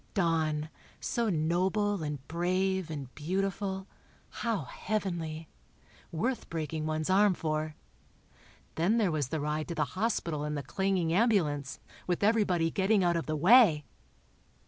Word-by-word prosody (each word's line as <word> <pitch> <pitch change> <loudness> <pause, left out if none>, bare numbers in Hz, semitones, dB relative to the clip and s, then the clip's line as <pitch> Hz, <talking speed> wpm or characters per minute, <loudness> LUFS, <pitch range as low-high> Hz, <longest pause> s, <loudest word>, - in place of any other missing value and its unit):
Don, 160 -4 +1 0.3
so 235 -2 -1
noble 185 +4 +1
and 150 -3 -5
brave 185 +1 0
and 140 -5 -6
beautiful—how 195 +5 -3
heavenly—worth 170 - -5
breaking 155 -1 -3
one's 155 +1 -2
arm 200 0 +5
for. 155 -1 -2 1.0
Then 185 +8 +2
there 205 -6 +2
was 150 -4 -1
the 160 +4 -2
ride 150 +1 -2
to 170 - -4
the 155 -2 +1
hospital 185 -7 -1
in 150 0 -2
the 145 - -3
clanging 185 +1 0
ambulance, 170 - +1 0.3
with 180 +2 0
everybody 195 -7 +2
getting 195 +2 +2
out 175 -1 +2
of 165 - -2
the 155 - -1
way! 175 - +6
170 Hz, 125 wpm, -30 LUFS, 155-195 Hz, 1.0 s, way